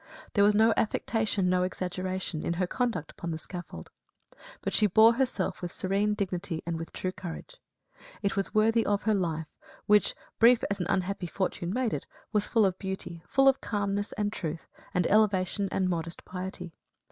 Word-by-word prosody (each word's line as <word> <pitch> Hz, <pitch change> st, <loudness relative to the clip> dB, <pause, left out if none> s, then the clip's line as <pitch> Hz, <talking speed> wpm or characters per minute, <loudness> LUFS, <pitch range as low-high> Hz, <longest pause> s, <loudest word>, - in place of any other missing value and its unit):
There 200 Hz, -, +4 dB
was 205 Hz, 0 st, +5 dB
no 220 Hz, +1 st, +5 dB
affectation, 220 Hz, -3 st, 0 dB
no 180 Hz, 0 st, +3 dB
exaggeration, 185 Hz, -2 st, -2 dB
in 170 Hz, -, 0 dB
her 180 Hz, +2 st, 0 dB
conduct 230 Hz, -, -2 dB
upon 170 Hz, -, -6 dB
the 160 Hz, -, -2 dB
scaffold; 175 Hz, +2 st, -8 dB, 0.7 s
but -, -, -3 dB
she 210 Hz, -, +4 dB
bore 220 Hz, +4 st, +6 dB
herself 245 Hz, -6 st, -1 dB
with 175 Hz, -1 st, -4 dB
serene 200 Hz, +2 st, 0 dB
dignity 180 Hz, -4 st, -3 dB
and 165 Hz, -1 st, -2 dB
with 165 Hz, -, -6 dB
true 185 Hz, -, -3 dB
courage. 185 Hz, -, -8 dB, 0.7 s
It 200 Hz, -, 0 dB
was 195 Hz, -1 st, 0 dB
worthy 225 Hz, +2 st, +3 dB
of 205 Hz, 0 st, 0 dB
her 215 Hz, +1 st, +2 dB
life 165 Hz, -5 st, -1 dB, 0.4 s
which, 210 Hz, -1 st, +4 dB, 0.2 s
brief 235 Hz, +1 st, +6 dB
as 200 Hz, -, -1 dB
an 180 Hz, -, -2 dB
unhappy 195 Hz, -1 st, -1 dB
fortune 175 Hz, 0 st, -2 dB
made 245 Hz, +1 st, 0 dB
it, -, -, -4 dB, 0.3 s
was 210 Hz, -1 st, +2 dB
full 225 Hz, -3 st, +4 dB
of 190 Hz, -1 st, 0 dB
beauty, 190 Hz, -3 st, -5 dB
full 270 Hz, 0 st, +4 dB
of 270 Hz, 0 st, +4 dB
calmness, 205 Hz, -1 st, -1 dB
and 205 Hz, 0 st, -1 dB
truth, 160 Hz, -3 st, -4 dB, 0.3 s
and 180 Hz, -1 st, +1 dB
elevation 200 Hz, -1 st, +2 dB
and 190 Hz, -1 st, +1 dB
modest 170 Hz, -1 st, -3 dB
piety. 180 Hz, -1 st, -6 dB
195 Hz, 180 wpm, -29 LUFS, 180-210 Hz, 0.7 s, bore